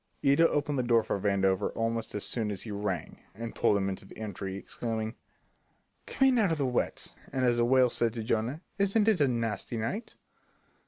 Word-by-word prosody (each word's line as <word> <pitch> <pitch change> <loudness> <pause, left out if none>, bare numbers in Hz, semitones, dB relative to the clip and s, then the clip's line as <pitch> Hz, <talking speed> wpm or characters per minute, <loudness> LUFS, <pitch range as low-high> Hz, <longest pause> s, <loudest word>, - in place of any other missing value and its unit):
Ida 140 +4 +5
opened 145 -1 0
the - - +3
door 120 -2 +3
for - - -2
Vandover 95 0 +1
almost 115 -1 -2
as 105 - -2
soon 110 -3 -1
as 100 -3 -3
he 110 - -7
rang, 100 -5 -3 0.2
and 115 +2 -6
pulled 100 - +3
him 95 -1 0
into 95 -1 -4
the - - -14
entry, 100 -3 -5
exclaiming: 110 +1 -4 0.9
"Come 270 0 +3
in 250 -2 +3
out 200 -6 +3
of 160 - 0
the 140 - 0
wet, 125 -1 -1 0.2
as 125 -3 +2
the 120 - +3
whale 130 0 +4
said 115 -2 +1
to 115 -2 -4
Jonah. 115 +8 -1 0.2
Isn't 200 +2 +3
it 210 -8 +4
a 140 - +5
nasty 115 -1 -2
night?" 180 - -3
115 Hz, 200 wpm, -29 LUFS, 105-140 Hz, 0.9 s, Ida